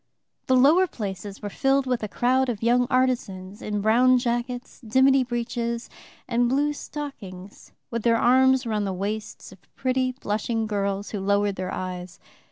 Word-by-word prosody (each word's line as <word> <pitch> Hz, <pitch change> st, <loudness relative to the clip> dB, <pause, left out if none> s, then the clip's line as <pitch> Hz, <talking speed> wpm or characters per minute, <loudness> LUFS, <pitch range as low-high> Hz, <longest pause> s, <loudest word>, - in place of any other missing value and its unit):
The 260 Hz, -, +4 dB
lower 310 Hz, +9 st, +5 dB
places 200 Hz, -, -6 dB
were 205 Hz, -, -4 dB
filled 270 Hz, +2 st, +1 dB
with 250 Hz, -2 st, -1 dB
a 215 Hz, -, -3 dB
crowd 255 Hz, +4 st, +1 dB
of 225 Hz, -3 st, -4 dB
young 245 Hz, +1 st, +3 dB
artisans 210 Hz, -7 st, -1 dB
in 210 Hz, -1 st, -2 dB
brown 245 Hz, +4 st, +4 dB
jackets, 245 Hz, +1 st, -3 dB
dimity 260 Hz, +3 st, +4 dB
breeches, 235 Hz, -1 st, -3 dB, 0.4 s
and 240 Hz, 0 st, +1 dB
blue 290 Hz, +3 st, +1 dB
stockings, 205 Hz, -12 st, -9 dB, 0.2 s
with 235 Hz, -1 st, -2 dB
their 230 Hz, +1 st, +3 dB
arms 260 Hz, +2 st, +4 dB
round 210 Hz, -3 st, -1 dB
the 190 Hz, -, -2 dB
waists 210 Hz, +3 st, -5 dB
of 190 Hz, -, -15 dB, 0.2 s
pretty 255 Hz, 0 st, 0 dB
blushing 225 Hz, -1 st, -2 dB
girls 200 Hz, -1 st, -2 dB
who 210 Hz, -, -3 dB
lowered 200 Hz, +1 st, +1 dB
their 185 Hz, 0 st, -4 dB
eyes. 180 Hz, -1 st, -6 dB
235 Hz, 160 wpm, -25 LUFS, 205-255 Hz, 0.4 s, lower